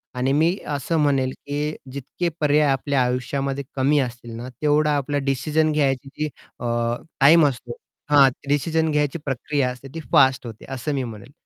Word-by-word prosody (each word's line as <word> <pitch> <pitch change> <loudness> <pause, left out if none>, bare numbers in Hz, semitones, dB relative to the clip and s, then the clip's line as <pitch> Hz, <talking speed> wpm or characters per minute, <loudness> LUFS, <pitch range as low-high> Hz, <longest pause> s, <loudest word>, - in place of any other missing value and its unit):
आणि 130 +2 0
मी 165 +6 +2 0.2
असं 145 +4 -1
म्हणेन 135 -3 +2
की 145 +3 -4 0.2
जितके 140 +6 -3
पर्याय 150 0 +3
आपल्या 135 0 +1
आयुष्यामध्ये 135 +2 -2
कमी 140 +2 +3
असतील 120 -2 -4
ना 120 +2 -7
तेवढा 150 0 +3
आपल्याला 140 0 -2
डिसिजन 150 +4 +1
घ्यायची 140 0 -1 0.3
अ, 120 - -5 0.5
टाईम 150 +3 +7
असतो 120 -3 -5 0.3
हा 145 -2 +7 0.2
डिसिजन 160 +3 +1
घ्यायची 150 +1 0
प्रक्रिया 135 0 -1
असते, 125 +2 -8
ती 165 - -5
फास्ट 130 -1 +4
होते 110 -2 -10
असं 135 +3 -3
मी 135 -2 -1
म्हणेन, 115 +2 -9
140 Hz, 155 wpm, -23 LUFS, 130-150 Hz, 0.5 s, टाईम